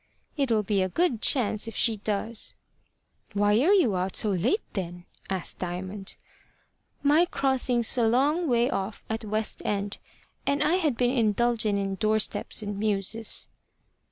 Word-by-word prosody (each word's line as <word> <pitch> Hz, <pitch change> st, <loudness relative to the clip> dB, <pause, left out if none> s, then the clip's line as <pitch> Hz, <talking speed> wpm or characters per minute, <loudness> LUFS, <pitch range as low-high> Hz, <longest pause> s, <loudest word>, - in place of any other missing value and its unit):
"It'll 240 Hz, -8 st, +1 dB
be 200 Hz, -1 st, +1 dB
a 185 Hz, -, 0 dB
good 270 Hz, -, 0 dB
chance 225 Hz, -4 st, +3 dB
if 225 Hz, -, -7 dB
she 225 Hz, -2 st, +2 dB
does." 210 Hz, +2 st, -3 dB, 0.8 s
"Why 205 Hz, +1 st, +3 dB
are 335 Hz, +8 st, +4 dB
you 340 Hz, -, +4 dB
out 185 Hz, +1 st, -2 dB
so 210 Hz, -, +2 dB
late, 215 Hz, -, +1 dB
then?" 175 Hz, -2 st, -5 dB, 0.2 s
asked 190 Hz, -2 st, -3 dB
Diamond. 185 Hz, +2 st, -5 dB, 0.9 s
"My 300 Hz, +4 st, +5 dB
crossing's 260 Hz, -7 st, +1 dB
a 230 Hz, -, +3 dB
long 290 Hz, +8 st, +2 dB
way 240 Hz, 0 st, +3 dB
off 195 Hz, -3 st, -3 dB
at 220 Hz, -, -1 dB
the 220 Hz, -, -10 dB
West 215 Hz, +1 st, 0 dB
End, 200 Hz, -1 st, -2 dB, 0.5 s
and 280 Hz, +1 st, +2 dB
I 315 Hz, +4 st, +3 dB
had 305 Hz, -10 st, 0 dB
been 250 Hz, +1 st, +1 dB
indulgin' 225 Hz, -1 st, +2 dB
in 195 Hz, -1 st, -2 dB
door 215 Hz, +3 st, +1 dB
steps 215 Hz, -, -1 dB
and 205 Hz, -1 st, -4 dB
mewses." 210 Hz, +1 st, -1 dB
220 Hz, 155 wpm, -27 LUFS, 200-250 Hz, 0.9 s, My